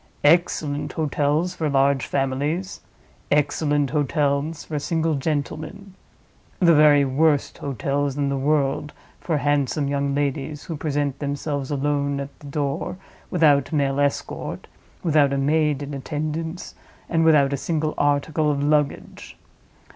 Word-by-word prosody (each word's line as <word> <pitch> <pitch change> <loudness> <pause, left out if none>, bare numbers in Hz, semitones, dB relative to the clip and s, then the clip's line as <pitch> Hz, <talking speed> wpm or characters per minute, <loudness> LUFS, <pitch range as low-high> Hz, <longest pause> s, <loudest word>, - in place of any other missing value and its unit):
"Excellent 150 -2 +2
hotels 155 +2 0
for 155 -2 -2
large 140 -1 +2
families; 145 +8 -2 0.5
excellent 145 -1 +1
hotels 145 +1 0
for 150 -2 -4
single 160 +2 0
gentlemen. 155 +7 -3 0.6
The 170 -2 +5
very 150 -2 +6
worst 145 +2 +1
hotels 140 +1 -2
in 145 -1 0
the 140 - 0
world 140 +1 0 0.3
for 160 -3 -1
handsome 145 0 0
young 140 0 -1
ladies 145 +1 -2
who 165 - -5
present 145 -2 -2
themselves 145 -1 -3
alone 140 0 0
at 140 0 -7
the 145 - -11
door 145 +5 -3 0.3
without 150 -5 +3
male 140 -3 +1
escort, 145 0 -2 0.4
without 150 -4 +3
a - - 0
maid 150 0 +1
in 145 +1 -6
attendance, 155 +4 -4 0.3
and 165 -1 +1
without 145 -4 +4
a - - +2
single 155 +1 -1
article 145 +2 +1
of 145 -1 0
luggage. 150 -1 -1
145 Hz, 130 wpm, -23 LUFS, 140-155 Hz, 0.6 s, very